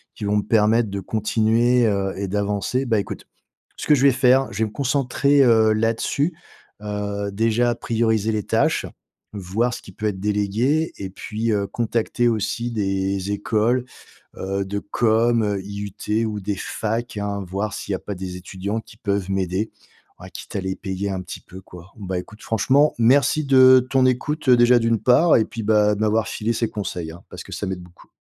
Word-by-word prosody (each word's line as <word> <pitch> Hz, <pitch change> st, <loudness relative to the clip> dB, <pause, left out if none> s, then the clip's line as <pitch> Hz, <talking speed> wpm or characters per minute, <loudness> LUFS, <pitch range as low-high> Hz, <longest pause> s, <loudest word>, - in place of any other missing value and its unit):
qui -, -, -9 dB
vont 105 Hz, +1 st, +1 dB
me 105 Hz, -, 0 dB
permettre 110 Hz, +1 st, +2 dB
de 100 Hz, 0 st, -4 dB
continuer, 115 Hz, +4 st, +2 dB
heu, 100 Hz, -2 st, 0 dB
et 100 Hz, 0 st, -3 dB
d'avancer. 105 Hz, +6 st, -1 dB
Bah 115 Hz, -4 st, +1 dB
écoute, 100 Hz, -, -6 dB, 0.5 s
ce -, -, -6 dB
que 150 Hz, -, +6 dB
je 135 Hz, -, 0 dB
vais 140 Hz, -, +7 dB
faire, 130 Hz, +1 st, +4 dB
je 100 Hz, -, -6 dB
vais 110 Hz, -, +2 dB
me 105 Hz, -, -6 dB
concentrer, 140 Hz, +1 st, +2 dB
heu, 110 Hz, -3 st, +4 dB
là-dessus, 115 Hz, +8 st, 0 dB, 0.5 s
heu, 100 Hz, -1 st, -3 dB
déjà 115 Hz, +3 st, +1 dB
prioriser 110 Hz, -2 st, 0 dB
les 105 Hz, -1 st, -1 dB
tâches, -, -, +1 dB, 0.5 s
voir 105 Hz, +5 st, -1 dB
ce -, -, -6 dB
qui -, -, -13 dB
peut 110 Hz, -, -6 dB
être 100 Hz, -3 st, -3 dB
délégué, 105 Hz, +10 st, 0 dB
et 95 Hz, -, -6 dB
puis, 110 Hz, +4 st, -3 dB
heu, 100 Hz, -2 st, 0 dB
contacter 120 Hz, +2 st, -1 dB
aussi 115 Hz, +2 st, -2 dB
des 95 Hz, -2 st, -1 dB
écoles, 110 Hz, +4 st, 0 dB, 0.5 s
heu, 95 Hz, +1 st, -2 dB
de 100 Hz, +1 st, -4 dB
com, 110 Hz, -1 st, +1 dB
IUT 100 Hz, +2 st, -3 dB
ou 105 Hz, -1 st, -4 dB
des 100 Hz, +1 st, -3 dB
facs, 110 Hz, +3 st, -3 dB
hein, 100 Hz, -1 st, -3 dB
voir 100 Hz, +4 st, -3 dB
s'il -, -, -5 dB
y -, -, +1 dB
a -, -, -11 dB
pas 105 Hz, -, -6 dB
des 90 Hz, 0 st, -6 dB
étudiants 95 Hz, +4 st, -4 dB
qui 110 Hz, -, -17 dB
peuvent 100 Hz, -3 st, -2 dB
m'aider, 95 Hz, +2 st, -1 dB, 0.5 s
à 95 Hz, +1 st, -11 dB
quitte 105 Hz, -, -8 dB
à -, -, 0 dB
les 95 Hz, 0 st, -3 dB
payer 95 Hz, +1 st, -4 dB
un 95 Hz, -1 st, -3 dB
petit 90 Hz, -, -8 dB
peu, 95 Hz, -, -12 dB
quoi. 90 Hz, 0 st, -14 dB
Bah 95 Hz, -3 st, -4 dB
écoute, 105 Hz, +4 st, -10 dB
franchement, 135 Hz, +7 st, +2 dB
merci 140 Hz, +6 st, +3 dB
de 130 Hz, -2 st, +6 dB
ton 130 Hz, -1 st, +3 dB
écoute, 140 Hz, +4 st, -1 dB
heu, 125 Hz, -, +7 dB
déjà 120 Hz, +1 st, +5 dB
d'une 115 Hz, -2 st, +1 dB
part, 155 Hz, +7 st, +5 dB
et 110 Hz, -, +3 dB
puis 115 Hz, -, -7 dB
bah, 105 Hz, -1 st, +3 dB
de -, -, -7 dB
m'avoir 110 Hz, 0 st, +1 dB
filé 110 Hz, +2 st, -2 dB
ces 115 Hz, 0 st, -1 dB
conseils, 90 Hz, -6 st, -5 dB
hein, 85 Hz, -, -14 dB
parce -, -, -8 dB
que -, -, -13 dB
ça 105 Hz, -, -4 dB
m'aide 95 Hz, -1 st, -4 dB
beaucoup. 90 Hz, 0 st, -18 dB
110 Hz, 195 wpm, -22 LUFS, 100-120 Hz, 0.5 s, vais